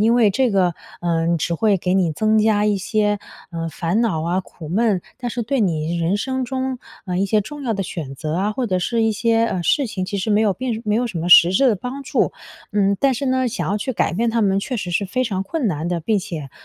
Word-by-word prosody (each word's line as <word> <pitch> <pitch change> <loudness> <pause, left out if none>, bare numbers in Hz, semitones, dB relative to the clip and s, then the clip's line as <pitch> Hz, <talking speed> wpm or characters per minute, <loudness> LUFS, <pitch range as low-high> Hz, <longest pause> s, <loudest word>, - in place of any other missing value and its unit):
因 225 +2 +4
为 230 -4 +4
这 250 +5 +1
个， 185 -4 +2 0.3
呃， 170 0 +1
只 170 +2 -1
会 210 +3 +2
给 180 0 -1
你 175 -4 +2
增 215 +6 +2
加 210 -1 +3
一 210 -1 +2
些， 210 +1 0 0.3
呃， 165 -1 -4
烦 170 +6 -1
恼 190 -10 0
啊、 175 +3 0
苦 165 -4 -11
闷， 205 +1 +1 0.2
但 245 -2 -3
是 240 - -3
对 250 +3 -1
你 165 -3 0
人 170 +4 +1
生 260 +4 -2
中， 260 0 -3 0.3
呃， 180 -1 -2
一 195 - +2
些 215 +1 +2
重 290 +8 -7
要 235 -4 -1
的 195 - -2
选 155 -6 -6
择 155 +3 -4
啊， 200 +4 0
或 255 +1 -2
者 185 -4 0
是 230 +6 0
一 225 -1 +2
些 230 +1 +2
呃， 180 -5 -2
事 280 - +2
情 190 -4 -3
其 200 +2 -3
实 190 - -3
没 210 0 +4
有 215 -2 +3
并 235 0 -3
没 210 0 +1
有 245 +2 +1
什 195 -7 -4
么 165 +2 -2
实 175 0 +8
质 260 +8 +4
的 225 - +3
帮 250 +7 -6
助。 270 - 0 0.4
嗯， 200 -1 +2
但 275 -1 +3
是 275 +3 -3
呢， 260 -1 +1
想 240 - -3
要 205 - 0
去 260 +5 -3
改 210 - 0
变 230 +6 0
他 230 0 +1
们 195 -1 +2
确 250 - -3
实 185 -5 -4
是 195 +3 0
非 255 +6 -1
常 190 -5 -2
困 280 +6 -2
难 165 -3 -2
的， 175 -1 -1
并 210 +6 +1
且， 160 -7 -6
205 Hz, 280 characters per minute, -21 LUFS, 180-235 Hz, 0.4 s, 实